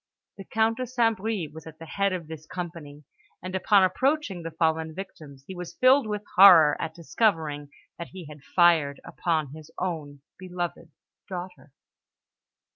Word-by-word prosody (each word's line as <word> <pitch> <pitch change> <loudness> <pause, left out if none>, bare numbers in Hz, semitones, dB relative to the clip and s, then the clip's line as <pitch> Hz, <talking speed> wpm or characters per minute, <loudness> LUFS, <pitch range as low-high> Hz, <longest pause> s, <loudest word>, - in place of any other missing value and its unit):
The 195 - -8
Count 225 +2 +1
de 255 -1 -4
St. 235 -2 +1
Bris 195 -6 -3
was 160 0 -11
at 160 -1 -11
the 165 - -10
head 200 +5 -1
of 175 -4 -5
this 160 -1 -10
company; 165 -5 -8 0.4
and 185 0 -6
upon 195 +1 +4
approaching 255 - 0
the 165 - -5
fallen 160 -1 -1
victims, 155 -8 -10
he 190 - -8
was 180 -1 -8
filled 260 -1 +4
with 210 -1 -3
horror 170 -6 +8
at 160 - -5
discovering 160 -5 -1 0.3
that 170 - -6
he 185 -2 -10
had 150 -1 -12
fired 160 -3 +3
upon 155 -5 -2
his 155 0 -12
own 150 -6 -5 0.2
beloved 175 -2 -5 0.4
daughter! 175 -7 -8
175 Hz, 160 wpm, -26 LUFS, 155-195 Hz, 0.4 s, horror